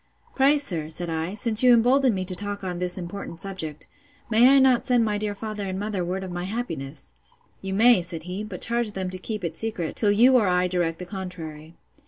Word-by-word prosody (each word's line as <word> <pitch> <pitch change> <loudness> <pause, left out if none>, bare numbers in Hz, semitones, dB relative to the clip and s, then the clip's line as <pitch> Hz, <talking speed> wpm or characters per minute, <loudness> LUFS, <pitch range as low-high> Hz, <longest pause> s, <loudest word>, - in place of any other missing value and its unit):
Pray 280 +2 +4
sir, 170 - -3
said 170 +1 -2
I, 165 +4 -3
since 220 0 +3
you 250 -1 +7
embolden 250 +1 +3
me 185 -1 -3
to 185 - -3
talk 205 +2 -5
on 180 -2 -4
this 180 0 0
important 175 -1 -7
subject, 165 -5 -4 0.5
may 235 +4 +6
I 275 - +6
not 260 -3 +3
send 245 -2 +3
my 210 -1 -1
dear 210 -1 -3
father 210 -1 -5
and 190 0 -4
mother 205 -3 -2
word 185 +2 -3
of 185 - -6
my 175 0 -4
happiness?—You 155 - -7
may, 230 -1 +5
said 170 -2 -6
he; 180 +4 -5
but 200 -4 -8
charge 235 -2 +1
them 185 -2 -4
to 185 - -5
keep 210 +1 -5
it 165 -2 -3
secret, 185 -6 -3
till 210 -2 +2
you 245 +5 +5
or 215 -5 +2
I 180 0 +2
direct 175 -2 -1
the 180 - -7
contrary. 170 -5 -8
190 Hz, 220 wpm, -24 LUFS, 175-220 Hz, 0.5 s, you